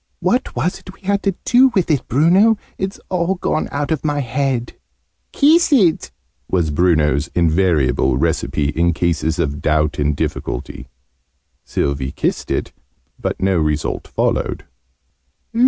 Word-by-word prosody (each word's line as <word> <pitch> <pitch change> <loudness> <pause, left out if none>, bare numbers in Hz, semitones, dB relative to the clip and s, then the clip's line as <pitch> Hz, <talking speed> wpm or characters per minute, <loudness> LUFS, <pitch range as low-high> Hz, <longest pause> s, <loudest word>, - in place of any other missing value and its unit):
"What 240 +9 0
was 180 - -1
it - - -12
we - - -27
had 200 +1 0
to 195 -3 0
do 255 +2 +6
with 180 -4 +2
it, 145 - 0
Bruno? 185 - +4 0.2
It's 190 +1 -3
all 180 +1 0
gone 165 -3 -2
out 145 +2 -2
of 160 - -1
my 145 -1 0
head!" 130 -1 -2 0.6
"Kiss 320 +4 +4
it!" 190 - +3 0.4
was 85 -4 +1
Bruno's 75 -2 +2
invariable 80 -6 +2
recipe 75 -1 0
in 85 +2 +1
cases 85 -1 0
of 75 -4 -2
doubt 75 -1 +1
and 75 0 +1
difficulty. - - -4 0.8
Sylvie 70 -1 -2
kissed - - -2
it, - - -2 0.5
but - - -3
no 95 -2 +2
result 75 -1 -1
followed. - - -1
95 Hz, 140 wpm, -18 LUFS, -, 0.8 s, do